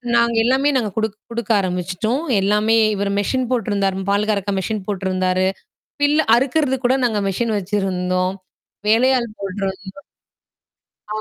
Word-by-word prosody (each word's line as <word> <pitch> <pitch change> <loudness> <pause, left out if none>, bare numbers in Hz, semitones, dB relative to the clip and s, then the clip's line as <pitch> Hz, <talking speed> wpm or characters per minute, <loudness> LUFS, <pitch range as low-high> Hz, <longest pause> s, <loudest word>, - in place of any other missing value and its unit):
நாங்க 235 0 +3
எல்லாமே 265 +4 +2
நாங்க 220 -5 -1
குடுக் 220 -1 -1
குடுக்க 235 -1 -3
ஆரம்பிச்சுட்டோம். 185 - -2 0.2
எல்லாமே 210 +3 +2 0.2
இவரு 200 0 -1
மெஷின் 255 +5 0
போட்டுருந்தாரு. 200 -5 0
பால் 205 +1 +1
கரக்க 200 -1 -1
மெஷின் 210 +1 -3
போட்டுருந்தாரு. 185 -2 0 0.6
பில்ல 295 +1 +3
அறுக்குறது 265 +1 +1
கூட 255 +2 +3
நாங்க 220 -4 +1
மெஷின் 220 +3 -1
வச்சிருந்தோம். 185 -2 -1 0.5
வேலையாள் 235 0 +3
போட்டுருந்தோம். 195 0 -5 1.0
ஆ. 210 - -5
210 Hz, 125 wpm, -20 LUFS, 190-235 Hz, 1.0 s, நாங்க